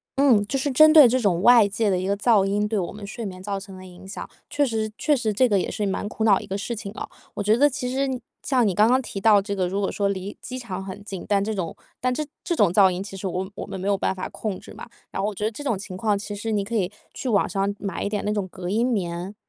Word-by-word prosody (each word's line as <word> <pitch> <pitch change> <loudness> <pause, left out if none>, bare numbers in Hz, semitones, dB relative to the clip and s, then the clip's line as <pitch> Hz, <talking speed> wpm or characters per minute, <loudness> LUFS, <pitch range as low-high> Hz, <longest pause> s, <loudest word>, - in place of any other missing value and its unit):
嗯， 255 -7 +4
就 275 - -1
是 275 +2 -1
针 310 +4 +7
对 300 -5 +10
这 255 +2 +2
种 190 -7 +1
外 235 -1 +7
界 205 +2 0
的 185 - +2
一 185 - -2
个 200 - +1
噪 205 -1 +3
音 205 +2 0
对 215 0 -1
我 175 - -3
们 205 0 -8
睡 225 +3 -6
眠 185 -2 -7
造 200 0 -3
成 195 -1 -11
的 185 - -11
影 185 +1 -13
响， 195 - -7 0.2
确 290 0 +2
实 220 -3 -2
确 300 - +2
实 225 -5 -1
这 255 +5 +4
个 200 -2 +3
也 - - -2
是 210 - -2
蛮 195 +1 -2
苦 220 +1 -4
恼 210 -3 +5
的 - - -6
一 - - -11
个 195 - -3
事 235 +4 -4
情 210 -2 -6
啊。 - - -6 0.3
我 205 - -2
觉 215 +2 +3
得 290 +3 +5
其 255 -2 -4
实 265 -1 -1 0.2
像 255 -4 +2
你 195 - +1
刚 210 +3 +5
刚 255 +2 +3
提 205 - -6
到 205 0 +5
这 200 0 -4
个 185 -2 0
如 195 +3 -2
果 195 - 0
说 200 - 0
离 195 +1 -4
机 255 - -6
场 195 -6 -5
很 190 +1 -8
近， 195 -3 -7
但 200 -1 +2
这 220 +2 -2
种 185 -5 -3 0.2
但 255 0 0
这 305 +4 -2 0.2
这 345 - -1
种 205 - +4
噪 190 +1 +6
音 180 +1 -3
其 195 -1 -8
实 195 - -4
我 185 +1 -3
我 - - -5
们 190 - -6
没 190 - -3
有 200 -1 +2
办 190 - 0
法 185 - -5
控 205 -4 -4
制 - - -13
嘛。 - - -10 0.2
然 - - -3
后 200 - 0
我 215 - -3
觉 210 - -5
得 215 - +1
这 290 - -8
种 235 -8 0
情 185 -1 -8
况 210 0 +1
其 205 +1 -6
实 220 +2 -4
你 205 -2 +1
可 230 +4 -5
以 195 -3 0 0.2
去 - - -6
网 205 -4 +3
上 195 +1 0
买 200 -1 -4
一 - - -1
点 205 -1 -2
那 210 - 0
种 205 -3 -1
隔 180 -1 -7
音 225 +5 +2
棉， 180 -3 -3
205 Hz, 330 characters per minute, -24 LUFS, 195-230 Hz, 0.3 s, 对